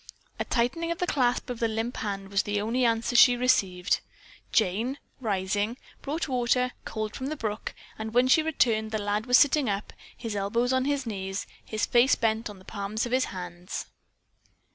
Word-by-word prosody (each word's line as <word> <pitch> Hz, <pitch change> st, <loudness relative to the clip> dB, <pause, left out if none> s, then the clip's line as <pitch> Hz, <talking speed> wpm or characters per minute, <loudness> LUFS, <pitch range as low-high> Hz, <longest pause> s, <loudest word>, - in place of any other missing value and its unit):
A -, -, -1 dB
tightening 260 Hz, +8 st, 0 dB
of 335 Hz, -, -1 dB
the 360 Hz, -, 0 dB
clasp 250 Hz, -5 st, +1 dB
of 240 Hz, -, -5 dB
the 230 Hz, -, +2 dB
limp 225 Hz, +2 st, -3 dB
hand 195 Hz, -2 st, -4 dB
was 195 Hz, 0 st, +3 dB
the 205 Hz, 0 st, -1 dB
only 235 Hz, +4 st, +1 dB
answer 230 Hz, +1 st, +1 dB
she 245 Hz, 0 st, +7 dB
received. 195 Hz, -8 st, +2 dB, 0.5 s
Jane, 225 Hz, +6 st, +1 dB, 0.2 s
rising, 205 Hz, 0 st, -1 dB, 0.2 s
brought 310 Hz, +4 st, -2 dB
water, 250 Hz, -1 st, +1 dB
cold 215 Hz, -1 st, -4 dB
from 260 Hz, -, -4 dB
the 310 Hz, -, -2 dB
brook, 215 Hz, -6 st, -4 dB, 0.2 s
and 220 Hz, 0 st, -4 dB
when 245 Hz, +2 st, +4 dB
she 290 Hz, +5 st, +5 dB
returned 230 Hz, -9 st, +1 dB
the 220 Hz, -, -1 dB
lad 205 Hz, +2 st, -1 dB
was 250 Hz, 0 st, +7 dB
sitting 290 Hz, -3 st, +4 dB
up, 200 Hz, +1 st, -3 dB, 0.2 s
his 225 Hz, -3 st, -4 dB
elbows 230 Hz, +6 st, +1 dB
on 260 Hz, 0 st, +2 dB
his 285 Hz, -2 st, 0 dB
knees, 195 Hz, -3 st, -4 dB, 0.2 s
his 215 Hz, 0 st, -1 dB
face 245 Hz, +3 st, +4 dB
bent 225 Hz, -1 st, 0 dB
on 205 Hz, -, -10 dB
the 185 Hz, -, -17 dB
palms 210 Hz, +2 st, -3 dB
of 240 Hz, -, -5 dB
his 255 Hz, +1 st, +3 dB
hands. 180 Hz, 0 st, -6 dB
225 Hz, 185 wpm, -27 LUFS, 205-255 Hz, 0.5 s, she